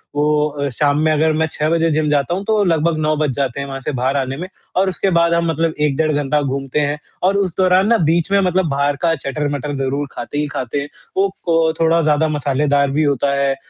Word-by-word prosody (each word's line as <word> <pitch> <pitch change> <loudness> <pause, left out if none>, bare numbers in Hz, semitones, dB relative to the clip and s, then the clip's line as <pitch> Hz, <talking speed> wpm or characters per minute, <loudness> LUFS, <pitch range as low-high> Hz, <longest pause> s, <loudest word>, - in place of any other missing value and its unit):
वो 150 0 +2
अ, 140 -1 -3
शाम 145 +3 +1
में 155 0 +2
अगर 155 +1 +2
मैं 160 +1 +1
6 150 +1 -1
बजे 165 0 +2
जिम 150 0 +1
जाता 145 +2 +1
हूँ, 195 - -4
तो 215 -2 +2
लगभग 165 -2 +1
9 155 0 +1
बज 150 -3 0
जाते 135 -1 -2
हैं 140 - -4
वहाँ 135 0 -5
से 150 - -3
बाहर 130 +2 -1
आने 135 0 -2
में 180 +3 -5 0.3
और 190 +1 +2
उसके 190 +1 -1
बाद 170 0 +3
हम 170 0 +1
मतलब 160 +1 0
1 145 -2 +2
डेढ़ 155 -1 +1
घंटा 145 +1 0
घूमते 135 +1 -2
हैं 145 0 0 0.3
और 195 +2 +3
उस 185 -4 -1
दौरान 185 +1 +3
ना 235 - +4
बीच 170 +3 +1
में 200 - +4
मतलब 185 -1 +1
बाहर 140 +1 0
का 165 -1 +2
चटर-मटर 145 0 -3
ज़रूर 135 +1 -2
खाते 145 - -6
ही 150 - 0
खाते 140 -1 -3
हैं। 145 - -7 0.3
वो 195 +1 +3 0.2
फ 165 -1 +2
थोड़ा 165 +1 +3
ज़्यादा 155 0 +2
मसालेदार 145 -1 +1
भी 150 +3 +1
होता 140 -1 +1
है 140 -1 +1
150 Hz, 240 wpm, -18 LUFS, 140-165 Hz, 0.3 s, ना